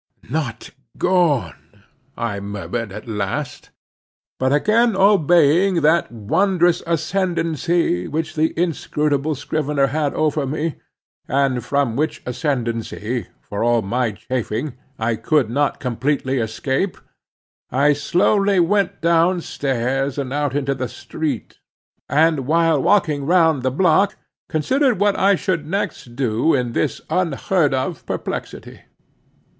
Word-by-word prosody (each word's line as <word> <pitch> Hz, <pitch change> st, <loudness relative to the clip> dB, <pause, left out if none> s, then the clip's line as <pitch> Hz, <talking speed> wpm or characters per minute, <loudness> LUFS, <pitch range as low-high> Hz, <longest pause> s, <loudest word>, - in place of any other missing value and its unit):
"Not 130 Hz, -7 st, -3 dB, 0.3 s
gone!" 145 Hz, -, 0 dB, 0.3 s
I 115 Hz, -4 st, -2 dB
murmured 105 Hz, +2 st, -5 dB
at 100 Hz, -, -9 dB
last. 105 Hz, +6 st, -4 dB, 0.7 s
But 130 Hz, 0 st, +1 dB
again 215 Hz, +9 st, +3 dB
obeying 180 Hz, -2 st, +4 dB
that 155 Hz, 0 st, +3 dB
wondrous 175 Hz, -, +1 dB
ascendancy 170 Hz, -, 0 dB
which 160 Hz, +1 st, -3 dB
the 160 Hz, +1 st, +1 dB
inscrutable 150 Hz, -3 st, 0 dB
scrivener 145 Hz, 0 st, 0 dB
had 145 Hz, +1 st, -1 dB
over 150 Hz, -2 st, 0 dB
me, 155 Hz, +3 st, -2 dB, 0.5 s
and 135 Hz, -3 st, +1 dB
from 140 Hz, -4 st, 0 dB
which 155 Hz, +4 st, -2 dB
ascendancy, 120 Hz, -, -2 dB
for 100 Hz, +2 st, -4 dB
all 120 Hz, -1 st, +2 dB
my 120 Hz, +2 st, -1 dB
chafing, 120 Hz, +5 st, -3 dB, 0.2 s
I 115 Hz, 0 st, -1 dB
could 120 Hz, 0 st, +1 dB
not 145 Hz, +3 st, 0 dB
completely 130 Hz, +2 st, -1 dB
escape, 130 Hz, -, -2 dB, 0.7 s
I 145 Hz, +3 st, +4 dB
slowly 195 Hz, +6 st, +2 dB
went 200 Hz, +2 st, +1 dB
down 170 Hz, +2 st, +3 dB
stairs 135 Hz, -1 st, -2 dB
and 135 Hz, -2 st, -3 dB
out 145 Hz, -2 st, -1 dB
into 140 Hz, -1 st, 0 dB
the 130 Hz, -1 st, -3 dB
street, 145 Hz, -3 st, -5 dB, 0.5 s
and 155 Hz, -3 st, +2 dB
while 165 Hz, -2 st, +3 dB
walking 150 Hz, -8 st, +2 dB
round 165 Hz, -5 st, +4 dB
the 130 Hz, -, +1 dB
block, 185 Hz, +7 st, +2 dB, 0.3 s
considered 250 Hz, -, +1 dB
what 205 Hz, 0 st, +3 dB
I 200 Hz, +1 st, +4 dB
should 170 Hz, -5 st, -2 dB
next 165 Hz, -9 st, -3 dB
do 125 Hz, +4 st, +1 dB
in 125 Hz, -3 st, -1 dB
this -, -, -1 dB
unheard 170 Hz, -3 st, +1 dB
of 130 Hz, +6 st, -3 dB
perplexity. -, -, -5 dB
145 Hz, 120 wpm, -20 LUFS, 125-170 Hz, 0.7 s, obeying